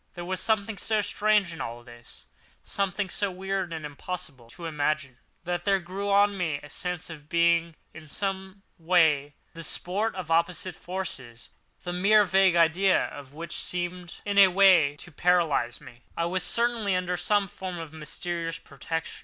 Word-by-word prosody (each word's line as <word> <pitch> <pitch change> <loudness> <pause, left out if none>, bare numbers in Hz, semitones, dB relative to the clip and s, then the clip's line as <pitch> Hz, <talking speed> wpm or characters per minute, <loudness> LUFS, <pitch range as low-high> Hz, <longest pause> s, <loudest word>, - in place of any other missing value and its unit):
There 175 -1 -6
was 185 +1 -2
something 215 -1 0
so 220 -1 +1
strange 205 -2 +2
in 165 - -7
all 120 +1 -6
this, 120 -1 -15 0.4
something 200 0 -2
so 205 - 0
weird 190 -1 -3
and 160 -2 -5
impossible 145 -4 -7
to 170 +8 -9
imagine, 150 -4 -1 0.2
that 175 0 -2
there 200 -1 +3
grew 190 +3 -5
on 200 0 +4
me 165 -6 -1
a 145 - -11
sense 180 -1 -3
of 155 -2 -9
my 145 - -27
being 170 -1 +2 0.2
in 160 -1 -11
some 190 +3 -4 0.2
way 160 -4 +3 0.2
the 165 0 -8
sport 200 +8 -1
of 180 -4 -5
opposite 170 +2 +1
forces—the 175 -2 -7
mere 205 +4 +5
vague 190 -2 +4
idea 170 +3 +3
of 140 -1 -11
which 170 +1 -5
seemed 180 -1 -3
in 200 -1 +2
a 195 - +10
way 180 -6 +5
to 175 +4 -11
paralyse 160 -7 +1
me. 120 -4 -14 0.2
I 170 - +1
was 180 +2 0
certainly 230 -1 +1
under 180 0 -1
some 200 +3 +1
form 185 -1 -6
of 165 -2 -7
mysterious 165 +2 -4
protection. 165 +2 -5
175 Hz, 170 wpm, -27 LUFS, 160-195 Hz, 0.4 s, a